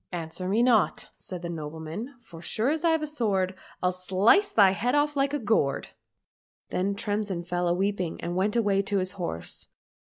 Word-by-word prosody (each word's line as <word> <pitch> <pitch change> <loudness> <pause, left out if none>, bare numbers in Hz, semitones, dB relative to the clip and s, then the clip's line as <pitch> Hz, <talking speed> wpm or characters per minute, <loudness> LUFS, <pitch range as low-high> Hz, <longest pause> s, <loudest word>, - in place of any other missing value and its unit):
— - - -50
" - - -54
Answer 165 +3 -5
me 220 +5 +3
not," 235 -5 +2
said 180 -2 -8
the - - -2
nobleman, 160 - -6
" - - -31
for 170 -8 -12
so - - -7
sure 230 +4 +1
as 315 +1 -2
I've 320 -2 +3
a - - +1
sword, 205 -11 0 0.3
I'll 180 - +3
slice 190 - +3
thy 200 -3 +6
head 245 +7 0
off 295 0 +2
like 275 0 +2
a 295 - 0
gourd." 210 - +1 0.4
— - - -65
Then 195 +2 0
Tremsin 205 -4 -2
fell 175 0 -1
a 175 - +3
weeping 190 -3 -1
and 175 +1 -3
went 200 +4 +1
away 205 -4 +3
to 200 0 -1
his 185 -1 -1
horse. 170 - -5
195 Hz, 215 wpm, -27 LUFS, 180-235 Hz, 0.4 s, thy